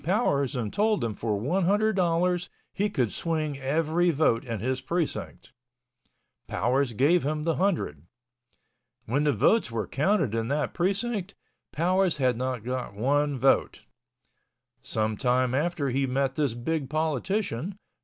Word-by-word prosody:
Powers 145 - +1
and 115 -4 -3
told 215 0 +2
him 115 -2 -1
for 105 0 -2
one 170 - 0
hundred 210 +3 +2
dollars 180 0 +1 0.2
he 205 +2 0
could 125 - 0
swing 155 -4 -2
every 160 +5 +1
vote 145 -7 +2
in 115 -4 -4
his 130 +4 -2
precinct. 165 -1 -3 0.9
Powers 130 0 0
gave 150 +10 +3
him 150 +2 -2
the 165 0 0
hundred. 155 - -1 1.0
When 140 +6 0
the 145 - +4
votes 145 - +3
were 115 -3 -2
counted 150 - +1
in 115 0 -1
that 145 +3 -1
precinct, 200 +2 -1 0.4
Powers 180 +1 +1
had 130 -3 +2
not 125 -1 -3
got 125 -3 -4
one 145 +5 +1
vote. 135 +2 +2 1.0
Some 110 -1 -1
time 125 0 +1
after 145 -1 0
he 135 +2 +1
met 135 +1 0
this 140 -5 0
big 135 +3 -2
politician. 160 - -1
145 Hz, 145 wpm, -27 LUFS, 125-175 Hz, 1.0 s, the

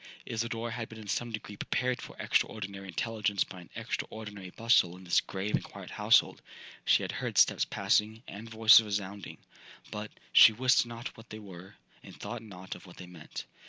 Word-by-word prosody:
'Isidora 115 0 -3
had 115 -1 -5
been 110 - -11
in 110 -1 -10
some 120 +3 -2
degree 105 -1 -6
prepared 125 +4 -1
for - - -10
extraordinary 100 -2 -1
intelligence 105 0 -1
by 90 - -11
an 85 - -15
extraordinary 105 -4 -5
bustle 90 -5 +3
in 95 - -13
this 90 -1 +3
grave 100 +2 -4
and - - +1
quiet - - -10
household. - - +3 0.4
She - - +4
had - - -3
heard - - -4
steps - - +5
passing, 110 +2 +1
and 110 +3 -9
voices 110 0 +8
resounding, 100 -1 -4 0.5
but 105 0 -5 0.2
'She 110 - +9
wist 125 +1 +3
not 120 +3 -7
what 115 -2 -15
they 110 - -7
were,' 95 -3 -11 0.3
and - - -13
thought 120 -1 -5
not 95 -4 -9
of - - -12
what 90 - -14
they 90 - -9
meant. 90 -3 -9
105 Hz, 185 wpm, -30 LUFS, 95-115 Hz, 0.5 s, She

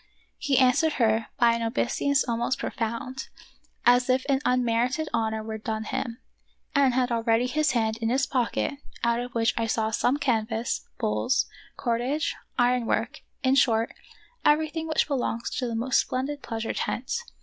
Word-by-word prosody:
*" - - -42
He 270 - +4
answered 260 +5 +4
her 225 -3 +2
by 235 -1 +5
an 230 - -2
obeisance 265 +4 +1
most 235 +2 0
profound, 235 +3 -4 0.6
as 245 +1 +5
if 255 +1 +2
an 275 -1 +2
unmerited 250 +4 +1
honor 220 -1 0
were 220 0 -5
done 220 0 -3
him, 230 +1 -3 0.6
and 275 -3 +3
had 255 -1 +1
already 230 +1 +2
his 300 +2 +1
hand 220 -2 +1
in 225 -1 -1
his 265 +3 +2
pocket, 255 +2 0 0.3
out 235 0 +2
of 245 0 -6
which 225 -2 +2
I 225 - 0
saw 220 0 0
come 245 +5 +2
canvas, 230 -4 -1
poles, 105 - +1 0.3
cordage, 255 +7 -1 0.2
iron 245 -1 +2
work, - - -1 0.2
in 260 0 +4
short, 230 -4 +3 0.5
everything 315 +2 +2
which 315 - +1
belongs 245 -5 -2
to 250 - -1
the 230 - -3
most 245 +3 +2
splendid 275 +3 -3
pleasure 225 -1 -3
tent. 245 - -2
245 Hz, 160 wpm, -26 LUFS, 230-265 Hz, 0.6 s, by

